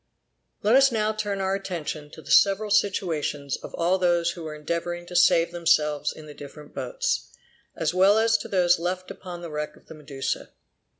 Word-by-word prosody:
Let 215 +4 +4
us 270 0 +6
now 215 -1 0
turn 205 -2 -3
our 190 0 0
attention 170 -6 -4
to 160 - -11
the 145 - -7
several 200 +2 +4
situations 165 -8 0
of - - -9
all 175 +3 +1
those 175 -1 +2
who 170 - -9
were 155 -1 -6
endeavoring 170 +3 -3
to 180 - -10
save 170 -1 +4
themselves 155 -4 +1
in 155 - -11
the 150 - -10
different 145 +1 -12
boats, - - -2 0.5
as 165 0 -1
well 190 +3 +5
as 225 0 +3
to - - -7
those 180 -3 +3
left 185 +2 -3
upon 175 -2 -8
the 170 - -7
wreck 150 0 -4
of - - -21
the - - -11
Medusa. 140 -3 -4
175 Hz, 190 wpm, -25 LUFS, 155-195 Hz, 0.5 s, us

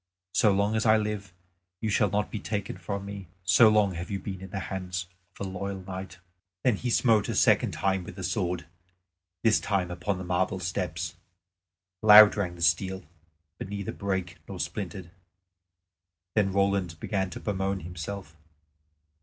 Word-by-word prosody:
So 105 +3 +4
long 100 +2 +1
as 110 - +1
I 110 0 +6
live, 105 -3 -3 0.5
you 110 +1 -1
shall 105 0 +3
not 105 +2 -1
be 110 - -3
taken 100 -2 -3
from 100 +2 -5
me, 100 -2 -7 0.2
so 95 +5 +6
long 105 -3 +3
have 85 +1 -6
you 100 - -1
been 95 -1 -6
in 95 - -8
the 95 +1 -4
hands 90 -2 -4 0.3
of 100 - -3
a - - -4
loyal 95 0 -4
knight." 95 0 -7 0.5
Then 120 -5 +3
he 125 - -3
smote 115 -3 +3
a - - -1
second - - +4
time 95 -1 0
with 90 - -9
the 95 - -7
sword, 90 -5 -1 0.8
this 115 -2 +4
time 95 -4 -1
upon 90 +3 -2
the 95 - -5
marble 90 +2 0
steps. 90 0 -3 0.9
Loud 105 -1 +9
rang 95 -4 -2
the 85 - -5
steel, 95 +3 +1 0.6
but - - -6
neither 100 -1 -4
brake 95 -3 -3
nor 95 -2 -7
splintered. 95 -3 -5 1.2
Then 100 -3 +2
Roland 100 -4 0
began 95 0 -1
to - - -7
bemoan 95 -1 -2
himself. 85 0 -7
95 Hz, 170 wpm, -28 LUFS, 90-100 Hz, 1.2 s, Loud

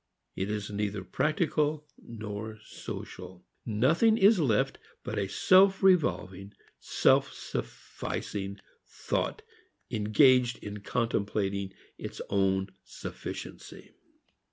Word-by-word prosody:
It 95 +2 -2
is 105 -1 -3
neither 100 -1 -2
practical 150 - 0
nor 110 -1 -7
social. 90 -1 -8 0.2
Nothing 155 - +3
is 200 0 +6
left 115 -9 +1 0.2
but - - -3
a 100 - -1
self 190 - +5
revolving, 105 - +2 0.3
self - - +3
sufficing 100 -1 -5 0.3
thought - - -2 0.5
engaged 120 +3 +4
in 105 0 -6
contemplating 100 -4 -1 0.3
its - - -7
own 95 -1 +1
sufficiency. - - -8
105 Hz, 90 wpm, -29 LUFS, 100-150 Hz, 0.5 s, is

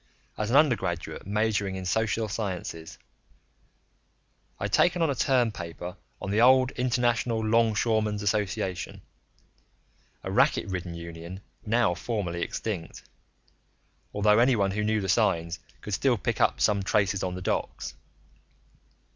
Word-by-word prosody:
As 105 0 -2
an 125 - +1
undergraduate 95 - +1
majoring 105 -2 0
in 95 0 -5
social 110 +3 0
sciences, 90 -6 -5 1.6
I'd - - -3
taken 175 -1 +4
on 160 - +2
a - - +1
term 125 -3 +2
paper 85 -1 -7 0.2
on 95 - -4
the 105 +2 +3
old 130 +1 +6
International 120 -2 +1
Longshoreman's 110 -1 +2
Association, 105 -2 -2 1.2
a - - -4
racket - - +3
ridden 90 -2 -4
union 85 +2 -8 0.3
now 115 -4 +3
formally 90 -5 -3
extinct 90 -3 -4 1.1
although 105 +1 +3
anyone 115 -6 +3
who 105 +2 -1
knew 110 0 +1
the 95 - -3
signs 85 -5 +1 0.2
could - - -6
still - - +2
pick - - -2
up - - +3
some 100 -1 +3
traces 100 -1 +1
on 90 -1 -2
the 90 - -6
docks. - - -2
105 Hz, 130 wpm, -27 LUFS, 90-115 Hz, 1.6 s, old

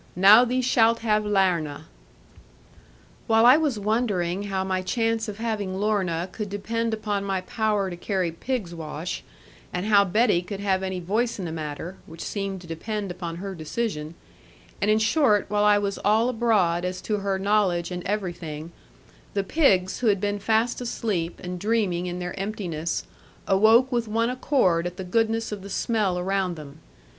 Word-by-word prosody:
Now 205 +7 +8
thee 255 +1 0
shalt 230 -2 +3
have 215 -2 +2
Larna.' 175 -8 +1 1.4
While 225 +1 +5
I 250 +2 +9
was 300 -7 0
wondering 205 -4 0
how 190 -1 -1
my 190 -1 -1
chance 225 +3 0
of 205 -1 -6
having 215 -4 -2
Lorna 190 -5 0
could 210 -1 -5
depend 225 +3 -2
upon 210 -2 -2
my 195 -2 -1
power 210 -1 0
to - - -5
carry 180 -1 -1
pig's 195 0 -3
wash, 160 +1 -5 0.5
and 180 +2 -3
how 205 -2 +5
Betty 205 -1 +2
could 195 +2 -7
have 195 -2 +1
any 190 -1 -3
voice 215 +7 -1
in 190 - -4
the 165 - -4
matter 160 +3 -5
(which 165 +1 -8
seemed 195 -2 -4
to - - -12
depend 200 +4 -4
upon 175 -2 -5
her 195 +3 -5
decision), 160 -1 -4 0.7
and 205 - +2
in 215 - +5
short, 215 -1 +3
while 210 0 +2
I 210 0 +6
was 200 -1 -2
all 220 +4 +3
abroad 210 -8 +2
as 180 0 -3
to 215 - -1
her 195 -1 -1
knowledge 190 -3 +1
and 180 0 -4
everything, 170 -6 -4 0.6
the 200 - +1
pigs, 190 - +2
who 245 - 0
had 200 -2 +3
been 205 +1 -1
fast 225 +4 +1
asleep 205 -8 -2
and 180 0 -5
dreaming 200 -4 0
in 175 0 -4
their 180 -1 -4
emptiness, 180 -6 -3 0.4
awoke 225 +7 +5
with 235 -2 0
one 230 +3 +1
accord 185 - +1
at 175 0 -8
the 190 - -4
goodness 225 +4 0
of 205 -2 -5
the 200 - -9
smell 205 -3 0
around 185 0 -1
them. 150 -1 -11
200 Hz, 175 wpm, -25 LUFS, 180-220 Hz, 1.4 s, I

